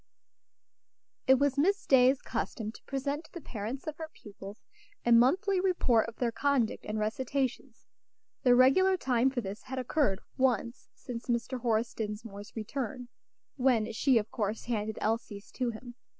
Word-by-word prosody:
It 265 Hz, -, +8 dB
was 280 Hz, +1 st, +1 dB
Miss 395 Hz, +7 st, +2 dB
Day's 260 Hz, 0 st, +5 dB
custom 220 Hz, -2 st, -3 dB
to -, -, -15 dB
present 280 Hz, +3 st, -3 dB
to -, -, -18 dB
the 345 Hz, -, -7 dB
parents 235 Hz, -1 st, -6 dB
of 305 Hz, -1 st, -5 dB
her 320 Hz, -1 st, -6 dB
pupils 200 Hz, -5 st, -11 dB, 0.4 s
a 240 Hz, -, +3 dB
monthly 365 Hz, -, +4 dB
report 265 Hz, -, +2 dB
of 230 Hz, -, -12 dB
their 240 Hz, -2 st, 0 dB
conduct 255 Hz, -1 st, 0 dB
and 210 Hz, +1 st, -2 dB
recitations. 255 Hz, +3 st, -2 dB, 0.6 s
The 245 Hz, -1 st, +5 dB
regular 370 Hz, +10 st, +5 dB
time 255 Hz, -5 st, +2 dB
for 260 Hz, -2 st, -2 dB
this 200 Hz, 0 st, -6 dB
had 260 Hz, 0 st, -7 dB
occurred 255 Hz, -5 st, +1 dB, 0.2 s
once 245 Hz, -2 st, 0 dB
since 240 Hz, -2 st, -7 dB
Mr. 240 Hz, +1 st, -1 dB
Horace 230 Hz, 0 st, 0 dB
Dinsmore's 210 Hz, -1 st, -6 dB
return, 245 Hz, +2 st, -4 dB, 0.5 s
when 240 Hz, -4 st, +2 dB
she, 260 Hz, +2 st, +3 dB
of 215 Hz, -1 st, -1 dB
course, 210 Hz, 0 st, -2 dB
handed 220 Hz, -2 st, -2 dB
Elsie's 215 Hz, -2 st, -2 dB
to 250 Hz, -2 st, -1 dB
him. 240 Hz, +2 st, -8 dB
245 Hz, 155 wpm, -30 LUFS, 220-270 Hz, 0.6 s, It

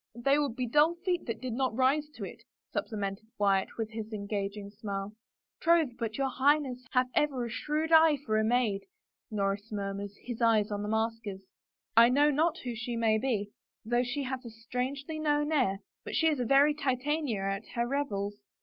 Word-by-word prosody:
" -, -, -48 dB
They 275 Hz, +5 st, +3 dB
would 280 Hz, -6 st, -1 dB
be 255 Hz, -, -1 dB
dull 300 Hz, +7 st, +4 dB
feet 355 Hz, -2 st, 0 dB
that 230 Hz, -, -3 dB
did 255 Hz, -2 st, -3 dB
not 255 Hz, -2 st, 0 dB
rise 285 Hz, +3 st, +2 dB
to -, -, -7 dB
it," -, -, -8 dB, 0.3 s
supplemented 205 Hz, -1 st, -3 dB
Wyatt 195 Hz, -2 st, +1 dB
with 225 Hz, -1 st, -3 dB
his 220 Hz, 0 st, -6 dB
engaging 200 Hz, -1 st, -4 dB
smile. 200 Hz, -1 st, -5 dB, 0.2 s
" -, -, -63 dB
Troth, 330 Hz, -7 st, +3 dB
but 225 Hz, -1 st, -3 dB
your 275 Hz, -1 st, +1 dB
Highness 260 Hz, -2 st, +1 dB
hath 255 Hz, 0 st, +2 dB
ever 270 Hz, -5 st, +1 dB
a 235 Hz, -, -6 dB
shrewd 305 Hz, +6 st, -1 dB
eye 320 Hz, -2 st, +7 dB
for 215 Hz, -1 st, +2 dB
a -, -, +2 dB
maid," 220 Hz, -3 st, +1 dB, 0.4 s
Norris 205 Hz, 0 st, -2 dB
murmured, 200 Hz, -1 st, -3 dB
his 240 Hz, -1 st, -6 dB
eyes 220 Hz, -3 st, +3 dB
on 205 Hz, 0 st, -2 dB
the 210 Hz, -, -3 dB
maskers. 220 Hz, -3 st, -2 dB, 0.3 s
" -, -, -57 dB
I 230 Hz, +1 st, +8 dB
know 290 Hz, +4 st, +4 dB
not 320 Hz, +4 st, +2 dB
who 245 Hz, -2 st, -3 dB
she 235 Hz, +2 st, -4 dB
may 220 Hz, -1 st, +3 dB
be, 210 Hz, -5 st, -1 dB, 0.3 s
though 240 Hz, +2 st, +2 dB
she 250 Hz, +3 st, -2 dB
hath 260 Hz, 0 st, -4 dB
a 235 Hz, -, -7 dB
strangely 255 Hz, +7 st, -4 dB
known 295 Hz, 0 st, +1 dB
air, 205 Hz, -10 st, +1 dB, 0.2 s
but -, -, -5 dB
she 320 Hz, 0 st, +4 dB
is 300 Hz, -4 st, 0 dB
a 245 Hz, -, 0 dB
very 275 Hz, +4 st, +5 dB
Titania 275 Hz, -4 st, -1 dB
at 195 Hz, +2 st, -2 dB
her 235 Hz, 0 st, +1 dB
revels. 205 Hz, -7 st, -2 dB
240 Hz, 200 wpm, -30 LUFS, 215-280 Hz, 0.4 s, I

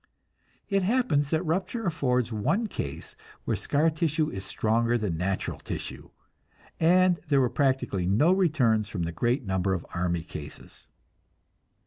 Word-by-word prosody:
It 195 Hz, -1 st, +1 dB
happens 185 Hz, -, +1 dB
that 160 Hz, +3 st, 0 dB
rupture 185 Hz, +8 st, -1 dB
affords 125 Hz, -, 0 dB
one 195 Hz, -, 0 dB
case 70 Hz, -, -6 dB, 0.3 s
where -, -, 0 dB
scar 155 Hz, +3 st, +1 dB
tissue 155 Hz, 0 st, 0 dB
is 95 Hz, -, -6 dB
stronger 115 Hz, +4 st, +1 dB
than 105 Hz, -7 st, -2 dB
natural 95 Hz, +3 st, -2 dB
tissue, -, -, -6 dB, 0.7 s
and 180 Hz, +1 st, +4 dB
there 140 Hz, -2 st, +3 dB
were 125 Hz, -2 st, +2 dB
practically 130 Hz, -9 st, 0 dB
no 115 Hz, -, +4 dB
returns 135 Hz, -, +2 dB
from 90 Hz, -5 st, -3 dB
the 85 Hz, -, -2 dB
great 120 Hz, -, 0 dB
number 95 Hz, 0 st, 0 dB
of 85 Hz, -, -6 dB
army 85 Hz, -1 st, -1 dB
cases. 75 Hz, -3 st, -10 dB
130 Hz, 140 wpm, -27 LUFS, 95-165 Hz, 0.7 s, and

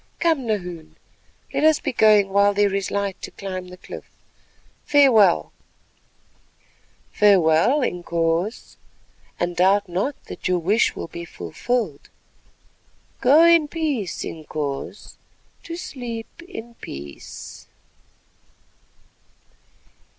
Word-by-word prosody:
Come, 320 Hz, -8 st, +1 dB
Nahoon, 180 Hz, -7 st, -4 dB, 0.6 s
let -, -, 0 dB
us 315 Hz, -1 st, +5 dB
be 280 Hz, -, -3 dB
going 210 Hz, -3 st, +5 dB
while 200 Hz, +1 st, +3 dB
there 205 Hz, -1 st, +2 dB
is 195 Hz, -1 st, -1 dB
light 200 Hz, -1 st, -2 dB
to -, -, -6 dB
climb 185 Hz, -2 st, -6 dB
the 180 Hz, 0 st, -11 dB
cliff. -, -, -10 dB, 0.7 s
Farewell." 230 Hz, -, +4 dB, 1.6 s
"Farewell 200 Hz, -, +4 dB
Inkoos, 170 Hz, +2 st, -2 dB, 0.6 s
and 175 Hz, 0 st, -1 dB
doubt 195 Hz, +3 st, +3 dB
not 195 Hz, +11 st, -2 dB
that -, -, -6 dB
your 180 Hz, 0 st, +2 dB
wish 200 Hz, +7 st, +2 dB
will -, -, -5 dB
be 170 Hz, +1 st, -8 dB
fulfilled. 170 Hz, -, -3 dB, 1.1 s
Go 290 Hz, +6 st, +6 dB
in 335 Hz, -2 st, +6 dB
peace 290 Hz, -, -2 dB
Inkoos—to 155 Hz, -, -7 dB
sleep 245 Hz, -6 st, -7 dB
in 235 Hz, -, -9 dB
peace." 70 Hz, 0 st, -9 dB
200 Hz, 100 wpm, -22 LUFS, 175-250 Hz, 1.6 s, Go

